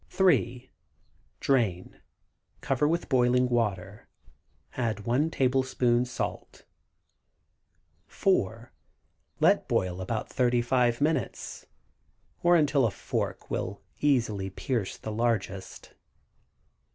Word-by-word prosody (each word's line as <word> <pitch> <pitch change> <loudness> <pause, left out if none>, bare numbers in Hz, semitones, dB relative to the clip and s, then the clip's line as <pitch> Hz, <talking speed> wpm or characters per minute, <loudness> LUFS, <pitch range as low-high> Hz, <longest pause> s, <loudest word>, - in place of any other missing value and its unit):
3. 130 -9 +1 0.7
Drain; 110 -10 0 0.6
cover 140 0 +1
with 170 +2 -1
boiling 125 -1 +3
water; 105 -4 -2 0.7
add 115 -4 -1
1 125 +9 +1
tablespoon 130 -3 +1
salt. 125 - -5 1.4
4. 115 - 0 0.7
Let - - +3
boil 90 0 0
about 110 +4 -3
35 120 0 +1
minutes, 150 -7 -2 0.7
or 175 0 +5
until 145 -5 +3
a - - 0
fork - - -4
will - - -3 0.2
easily 115 -9 +1
pierce 110 +1 -3
the 110 - -6
largest. 105 -4 -2
120 Hz, 90 wpm, -28 LUFS, 110-135 Hz, 1.4 s, or